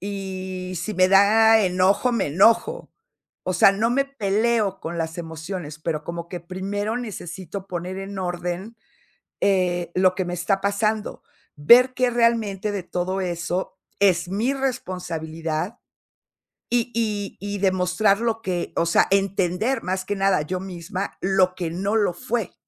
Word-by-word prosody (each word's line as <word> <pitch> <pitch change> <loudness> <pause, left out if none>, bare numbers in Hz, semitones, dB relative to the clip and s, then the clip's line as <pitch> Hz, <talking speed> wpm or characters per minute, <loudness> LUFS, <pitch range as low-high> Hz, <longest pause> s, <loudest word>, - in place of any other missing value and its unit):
y 190 -2 -5
si 185 +6 -3
me 185 0 +4
da 220 +3 +6
enojo, 190 +6 +2
me 230 - 0
enojo. 230 - +3 0.5
O 185 - -1
sea, 195 - +6
no 215 +3 +1
me 275 +3 +2
peleo 215 -5 0
con 170 +1 -5
las 165 +1 -3
emociones, 160 -1 -6
pero 155 -1 -3
como 170 0 -6
que 175 -1 -6
primero 200 +5 -3
necesito 190 -4 -7
poner 180 +1 -4
en 195 0 -6
orden, 180 +4 -4 0.6
eh, 180 -3 +1
lo 185 0 +3
que 185 - -1
me 175 0 -3
está 185 +3 0
pasando. 210 +2 -1 0.3
Ver 245 - +6
que 255 -1 +2
realmente 225 -4 +1
de 200 -2 -3
todo 185 +2 -2
eso 180 +1 -3 0.2
es 180 -3 +3
mi 215 +8 0
responsabilidad, 175 - -3 0.9
y 240 0 +1
y 210 -3 -2
y 205 0 -4
demostrar 190 +2 +2
lo 225 -1 -1
que 180 -5 -3
o - - +2
sea, 170 - +4
entender 195 +4 +1
más 185 0 -2
que 205 - -2
nada 195 -5 +2
yo 180 +4 -3
misma 185 +1 -5
lo 190 -1 +3
que 175 -3 -3
no 195 +6 -1
lo 205 -5 +2
fue. 225 +3 -3
190 Hz, 150 wpm, -23 LUFS, 180-215 Hz, 0.9 s, da